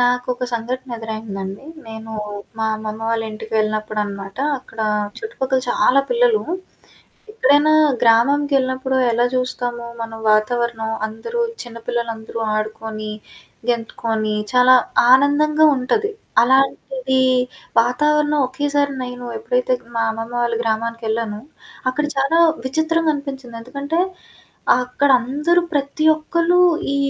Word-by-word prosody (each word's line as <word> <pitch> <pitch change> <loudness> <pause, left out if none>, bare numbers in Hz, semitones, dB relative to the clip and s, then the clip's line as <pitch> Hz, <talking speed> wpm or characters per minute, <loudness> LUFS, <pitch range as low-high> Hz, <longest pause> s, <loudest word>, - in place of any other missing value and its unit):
నాకోక 250 0 +1
సంఘటన 245 +2 -3
ఎదురైందండి. 215 -2 -6 0.2
నేను 220 0 -8 0.5
మా 220 - 0
అమ్మమ్మ 215 0 -6
వాళ్ళ 230 -1 0
ఇంటికి 220 +1 -9
వెళ్ళినప్పుడనమాట. 215 -2 -2 0.2
అక్కడ 235 -3 -18 0.4
చుట్టుపక్కల 265 -11 -2
చాలా 275 +2 +4
పిల్లలు, 475 -2 +3 0.9
ఎప్పుడైనా 295 - +4 0.3
గ్రామంకెళ్ళినప్పుడు 260 +2 +2 0.2
ఎలా 240 +2 +2
చూస్తాము. 245 -1 -2 0.2
మనం 225 0 -7
వాతావరణం. 225 +1 +1 0.2
అందరూ 225 - -5 0.2
చిన్న 235 -1 -9
పిల్లలందరూ 230 -2 -3 0.2
ఆడుకొని, 215 0 -4 0.6
గెంతుకొని, 225 -2 -2 0.2
చాలా 250 0 +6 0.4
ఆనందంగా 300 +3 +4
ఉంటది. 410 - 0 0.3
అలాంటిది 265 - +2 0.6
వాతావరణం 300 +5 +2
ఒకేసారి 285 +2 0
నేను 245 0 -7
ఎప్పుడైతే - - 0 0.2
మా 230 - +2
అమ్మమ్మ 225 +2 -6
వాళ్ళు 235 -1 0
గ్రామానికెళ్ళానో, 225 -1 -2 0.5
అక్కడ 295 +3 -2
చాలా 275 +5 +2 0.3
విచిత్రంగా 315 +3 +1
అనిపించింది. 270 -4 -7
ఎందుకంటే 285 +6 -2 0.8
అక్కడందరూ 275 +6 +2
ప్రతి 285 +2 -1
ఒక్కళ్ళు 335 +2 +1 0.4
ఈ - - +1
250 Hz, 100 wpm, -20 LUFS, 225-285 Hz, 0.9 s, చాలా